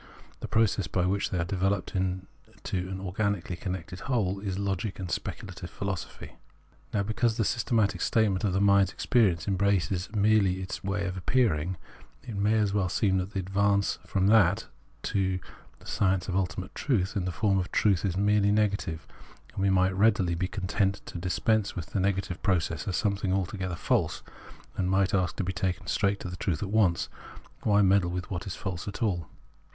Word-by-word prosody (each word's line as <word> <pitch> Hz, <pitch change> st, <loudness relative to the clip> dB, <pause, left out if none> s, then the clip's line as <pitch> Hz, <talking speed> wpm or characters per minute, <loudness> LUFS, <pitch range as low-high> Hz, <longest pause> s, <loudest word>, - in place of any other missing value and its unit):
The -, -, -5 dB
process 105 Hz, -5 st, +2 dB
by 90 Hz, +2 st, 0 dB
which 100 Hz, +2 st, 0 dB
they 95 Hz, -, -2 dB
are 85 Hz, -, +1 dB
developed 95 Hz, +1 st, -1 dB
into 95 Hz, 0 st, -4 dB
an 95 Hz, 0 st, -4 dB
organically 95 Hz, -1 st, -2 dB
connected 90 Hz, -1 st, -5 dB
whole 100 Hz, -7 st, 0 dB
is 95 Hz, -2 st, -3 dB
Logic 100 Hz, +1 st, -2 dB
and 90 Hz, -2 st, -5 dB
Speculative -, -, -5 dB
Philosophy. 100 Hz, -2 st, -6 dB, 0.5 s
Now, 100 Hz, -, +1 dB
because 110 Hz, +2 st, 0 dB
the 110 Hz, -, +1 dB
systematic 110 Hz, -6 st, +1 dB
statement 110 Hz, -3 st, +2 dB
of 100 Hz, -, +2 dB
the 95 Hz, -, +2 dB
mind's 100 Hz, -1 st, +5 dB
experience 95 Hz, -9 st, +2 dB
embraces 95 Hz, -2 st, +1 dB
merely 100 Hz, -3 st, +3 dB
its 95 Hz, +2 st, -5 dB
ways 100 Hz, 0 st, -1 dB
of 90 Hz, -, -6 dB
appearing, 90 Hz, -5 st, +1 dB, 0.5 s
it 115 Hz, -4 st, -7 dB
may 105 Hz, +2 st, +2 dB
well 100 Hz, -3 st, +1 dB
seem 95 Hz, -1 st, +2 dB
that 95 Hz, +3 st, -4 dB
the 100 Hz, -, -1 dB
advance 100 Hz, +1 st, +1 dB
from 95 Hz, -2 st, 0 dB
that 100 Hz, -4 st, +4 dB, 0.4 s
to 95 Hz, -2 st, 0 dB, 0.4 s
the -, -, -19 dB
science 95 Hz, -2 st, +1 dB
of 95 Hz, -, -2 dB
ultimate 95 Hz, 0 st, -2 dB
truth 110 Hz, -7 st, 0 dB
in 95 Hz, -3 st, -1 dB
the 90 Hz, -, -1 dB
form 95 Hz, +1 st, +1 dB
of 90 Hz, -, -3 dB
truth 100 Hz, -5 st, +2 dB
is 95 Hz, -3 st, -1 dB
merely 100 Hz, 0 st, +3 dB
negative; 100 Hz, -6 st, 0 dB, 0.5 s
and -, -, -4 dB
we 100 Hz, -, +3 dB
might 95 Hz, 0 st, +3 dB
readily 100 Hz, -4 st, +3 dB
be 90 Hz, +2 st, -1 dB
content 100 Hz, 0 st, -1 dB
to 85 Hz, -, -7 dB
dis 90 Hz, +1 st, -2 dB
pense 110 Hz, -3 st, +1 dB
with 85 Hz, -3 st, -6 dB
the 100 Hz, -, 0 dB
negative 95 Hz, -2 st, -1 dB
process 85 Hz, -3 st, 0 dB
as 95 Hz, -, 0 dB
something 100 Hz, -2 st, 0 dB
altogether 95 Hz, -1 st, -1 dB
false, -, -, 0 dB, 0.5 s
and 90 Hz, -1 st, 0 dB
might 95 Hz, 0 st, +2 dB
ask 90 Hz, -3 st, +1 dB
to -, -, -2 dB
be 95 Hz, +1 st, -2 dB
taken 95 Hz, 0 st, -2 dB
straight 100 Hz, -1 st, +1 dB
to -, -, -6 dB
the 90 Hz, 0 st, -6 dB
truth 90 Hz, 0 st, -1 dB
at 100 Hz, -, -4 dB
once: 100 Hz, -6 st, +3 dB, 0.5 s
why 105 Hz, -1 st, +4 dB
meddle 95 Hz, -2 st, +4 dB
with 90 Hz, +2 st, -4 dB
what 90 Hz, +1 st, -4 dB
is 95 Hz, -, -4 dB
false 95 Hz, -3 st, -5 dB
at 105 Hz, +4 st, -4 dB
all 90 Hz, -7 st, 0 dB
95 Hz, 185 wpm, -28 LUFS, 90-100 Hz, 0.5 s, mind's